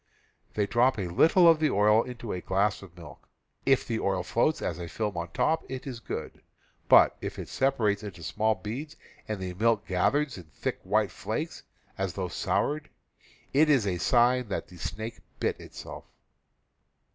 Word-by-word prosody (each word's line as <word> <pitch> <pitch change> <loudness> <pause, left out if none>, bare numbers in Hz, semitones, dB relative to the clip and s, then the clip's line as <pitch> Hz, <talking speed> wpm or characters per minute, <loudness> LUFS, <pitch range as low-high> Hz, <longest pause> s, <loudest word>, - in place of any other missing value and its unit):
They 105 - +2
drop 120 +4 +3
a 95 -4 -2
little 165 - +5
of 165 -2 +6
the 155 -1 +3
oil 105 +2 +4
into 120 -2 -6
a 90 - -4
glass 100 +3 0
of 90 -3 -14
milk. 85 -3 -13 0.4
If 135 -1 +4
the 115 -2 -1
oil 95 -2 0
floats 120 - +1
as - - -3
a 85 - -5
film 105 +1 -3
on 85 0 -4
top 160 - +1
it 130 0 -6
is 130 -4 -6
good; - - -6 0.5
but - - +7
if - - -5
it - - -6
sepa 135 +1 +1
rates 105 -3 +1
into 95 -6 -8
small 110 +6 +1
beads 140 +10 -6 0.3
and 110 -2 -3
the 90 -1 -4
milk 110 +2 +1
gathers 120 +6 +1
in 85 - -12
thick 80 - -4
white - - +1
flakes, - - -4 0.4
as 95 -3 -1
though 95 -2 -3
soured, 150 - -1 0.6
it 150 +3 +5
is 135 -8 +4
a 90 -3 -1
sign 125 +3 +3
that 100 - -4
the 90 - -13
snake 110 +6 -5 0.2
bit - - -1
itself. - - -9
110 Hz, 180 wpm, -28 LUFS, 95-130 Hz, 0.6 s, but